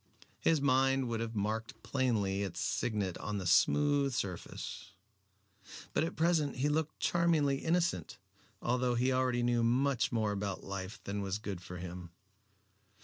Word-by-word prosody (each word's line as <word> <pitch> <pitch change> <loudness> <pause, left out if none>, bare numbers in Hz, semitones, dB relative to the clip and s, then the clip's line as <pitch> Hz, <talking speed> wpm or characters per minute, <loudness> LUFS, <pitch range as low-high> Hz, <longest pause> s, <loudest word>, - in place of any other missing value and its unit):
His 160 -2 +3
mind 135 -1 +3
would 115 -1 -1
have 115 0 -3
marked 110 +2 -3
plainly 110 -7 0
its 100 -3 -3
signet 105 -6 -1
on 105 0 -3
the 95 - -4
smooth 140 +8 +3
surface. 95 -7 -5 1.0
But - - +2
at 165 - -3
present 160 -3 +2
he 135 +3 +1
looked 155 +1 -1
charmingly 160 -5 +2
innocent, 170 +2 0 0.5
although 125 0 +1
he 125 +2 +2
already 130 -1 +1
knew 120 -1 +2
much 125 +1 +2
more 110 -3 +1
about 100 -1 -3
life 100 0 -5
than 100 +1 -3
was 95 0 -2
good 100 -4 -5
for 90 0 -8
him. 90 0 -7
120 Hz, 145 wpm, -33 LUFS, 100-140 Hz, 1.0 s, His